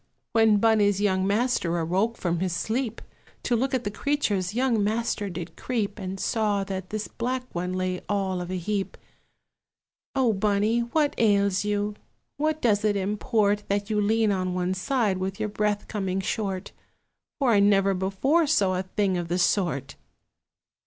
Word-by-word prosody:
When 225 Hz, -2 st, +5 dB
Bunny's 205 Hz, -2 st, +3 dB
young 190 Hz, -2 st, +1 dB
master 205 Hz, -5 st, +1 dB
awoke 185 Hz, +7 st, +1 dB
up -, -, -22 dB
from 175 Hz, +1 st, -1 dB
sleep, 220 Hz, +7 st, -2 dB, 0.4 s
To 240 Hz, -, +1 dB
look 260 Hz, +3 st, 0 dB
at 250 Hz, -, -1 dB
the 205 Hz, -, -3 dB
creatures 210 Hz, -7 st, -1 dB
young 245 Hz, -4 st, +2 dB
master 215 Hz, -1 st, -1 dB
did 175 Hz, -2 st, -7 dB
creep, 220 Hz, -4 st, -2 dB
And 190 Hz, 0 st, -5 dB
saw 210 Hz, -2 st, 0 dB
that 190 Hz, -1 st, -5 dB
this 215 Hz, 0 st, -3 dB
black 250 Hz, +2 st, -3 dB
one 180 Hz, +1 st, -2 dB
lay 185 Hz, 0 st, -2 dB
all 190 Hz, -3 st, 0 dB
of 175 Hz, -, -6 dB
a 185 Hz, -, -2 dB
heap. 195 Hz, +2 st, -3 dB, 1.2 s
"O 255 Hz, -4 st, +3 dB
Bunny, 210 Hz, +3 st, +1 dB
what 285 Hz, +5 st, +1 dB
ails 200 Hz, -3 st, +3 dB
you? 205 Hz, 0 st, 0 dB, 0.4 s
What 310 Hz, +1 st, -1 dB
does 210 Hz, -3 st, +3 dB
it 210 Hz, -1 st, +2 dB
import 205 Hz, +1 st, +1 dB
That 200 Hz, +2 st, -1 dB
you 210 Hz, -1 st, +2 dB
lean 220 Hz, +1 st, +2 dB
on 185 Hz, -2 st, -1 dB
one 180 Hz, 0 st, 0 dB
side, 205 Hz, -1 st, 0 dB
with 190 Hz, +1 st, -3 dB
your 215 Hz, -, -1 dB
breath 210 Hz, 0 st, -1 dB
coming 195 Hz, -3 st, -2 dB
short? 195 Hz, -1 st, -3 dB, 0.7 s
For 270 Hz, -5 st, +2 dB
I 205 Hz, -, +5 dB
never 200 Hz, -1 st, +4 dB
before 200 Hz, -, +1 dB
saw 195 Hz, -11 st, +2 dB
a -, -, +1 dB
thing 190 Hz, 0 st, -1 dB
of 175 Hz, -, -4 dB
the 175 Hz, +1 st, -1 dB
sort!" 175 Hz, -6 st, 0 dB
205 Hz, 165 wpm, -26 LUFS, 190-225 Hz, 1.2 s, When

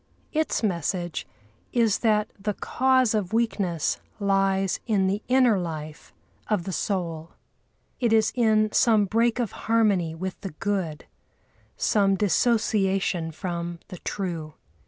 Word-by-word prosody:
Its 315 Hz, -5 st, 0 dB
message 175 Hz, -2 st, -2 dB, 0.4 s
is 230 Hz, -4 st, +2 dB
that 215 Hz, -2 st, +2 dB
the 205 Hz, 0 st, -2 dB
cause 260 Hz, -3 st, +2 dB
of 210 Hz, -3 st, -1 dB
weakness 200 Hz, -8 st, 0 dB, 0.2 s
lies 195 Hz, -1 st, +1 dB
in 205 Hz, -4 st, +2 dB
the 200 Hz, +2 st, 0 dB
inner 250 Hz, -5 st, +4 dB
life 155 Hz, -3 st, -6 dB, 0.4 s
of 210 Hz, -5 st, 0 dB
the 190 Hz, -, -4 dB
soul. 170 Hz, -4 st, -3 dB, 0.7 s
It 235 Hz, -3 st, +1 dB
is 220 Hz, -1 st, +4 dB
in 215 Hz, -3 st, +3 dB
some 220 Hz, -3 st, +4 dB
break 230 Hz, +4 st, +1 dB
of 240 Hz, -4 st, -1 dB
harmony 205 Hz, -8 st, +1 dB
with 185 Hz, +2 st, -5 dB
the 195 Hz, -, -6 dB
Good, 180 Hz, -3 st, -3 dB, 0.7 s
some 195 Hz, -2 st, +2 dB
dissociation 195 Hz, -4 st, +1 dB
from 170 Hz, 0 st, -4 dB
the 180 Hz, -4 st, -8 dB
True. 165 Hz, -6 st, -4 dB
195 Hz, 125 wpm, -25 LUFS, 175-220 Hz, 0.7 s, inner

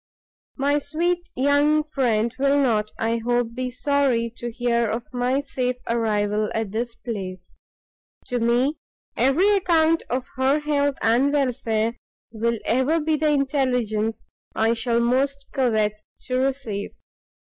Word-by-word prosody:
My 285 Hz, +1 st, +2 dB
sweet 345 Hz, +4 st, -1 dB
young 285 Hz, +3 st, +3 dB
friend 235 Hz, -6 st, 0 dB
will 280 Hz, +1 st, +3 dB
not, 220 Hz, -6 st, +2 dB
I 225 Hz, +1 st, 0 dB
hope, 240 Hz, 0 st, 0 dB
be 255 Hz, +1 st, -3 dB
sorry 255 Hz, -3 st, +1 dB
to 240 Hz, -, -4 dB
hear 235 Hz, -1 st, 0 dB
of 230 Hz, +2 st, -3 dB
my 250 Hz, +2 st, +1 dB
safe 255 Hz, -3 st, -2 dB
arrival 215 Hz, -2 st, 0 dB
at 220 Hz, -3 st, -2 dB
this 230 Hz, +2 st, -3 dB
place: 190 Hz, -7 st, -7 dB, 0.7 s
to 250 Hz, -1 st, -2 dB
me 245 Hz, +6 st, +2 dB, 0.4 s
every 275 Hz, +10 st, +3 dB
account 330 Hz, -4 st, +3 dB
of 255 Hz, +1 st, -1 dB
her 265 Hz, +2 st, +3 dB
health 285 Hz, -2 st, +1 dB
and 245 Hz, +5 st, +3 dB
welfare, 235 Hz, -5 st, 0 dB, 0.3 s
will 230 Hz, +1 st, -1 dB
ever 260 Hz, +7 st, +2 dB
be 315 Hz, 0 st, +1 dB
the 305 Hz, 0 st, +1 dB
intelligence 250 Hz, -6 st, 0 dB, 0.3 s
I 225 Hz, +1 st, +2 dB
shall 235 Hz, 0 st, 0 dB
most 275 Hz, +3 st, +1 dB
covet 215 Hz, -5 st, 0 dB, 0.2 s
to 255 Hz, -, -3 dB
receive. 260 Hz, -7 st, -2 dB
250 Hz, 135 wpm, -23 LUFS, 230-280 Hz, 0.7 s, young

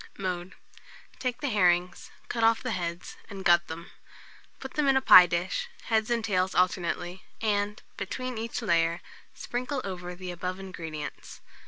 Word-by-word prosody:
Mode. 180 Hz, -1 st, -4 dB, 0.6 s
Take 250 Hz, -2 st, -2 dB
the 290 Hz, -, 0 dB
herrings, 180 Hz, -3 st, +2 dB, 0.2 s
cut 230 Hz, -, -2 dB
off 225 Hz, 0 st, +4 dB
the 255 Hz, -, -2 dB
heads, 170 Hz, -3 st, -4 dB
and 195 Hz, -2 st, -8 dB
gut 175 Hz, 0 st, +5 dB
them. 165 Hz, +1 st, -8 dB, 0.7 s
Put 265 Hz, -, -8 dB
them 300 Hz, -2 st, +1 dB
in 270 Hz, -1 st, +5 dB
a -, -, +5 dB
pie 180 Hz, -8 st, +10 dB
dish, 175 Hz, -, -1 dB, 0.2 s
heads 220 Hz, -1 st, +1 dB
and 235 Hz, -2 st, 0 dB
tails 185 Hz, -3 st, +1 dB
alternately, 180 Hz, 0 st, 0 dB, 0.2 s
and, 210 Hz, -1 st, 0 dB, 0.2 s
between 250 Hz, +4 st, -4 dB
each 230 Hz, +1 st, -4 dB
layer, 170 Hz, -3 st, +2 dB, 0.3 s
sprinkle 255 Hz, +3 st, -3 dB
over 180 Hz, -2 st, -5 dB
the 180 Hz, 0 st, -6 dB
above 180 Hz, +2 st, -4 dB
ingredients. 165 Hz, -6 st, -7 dB
185 Hz, 155 wpm, -28 LUFS, 175-225 Hz, 0.7 s, pie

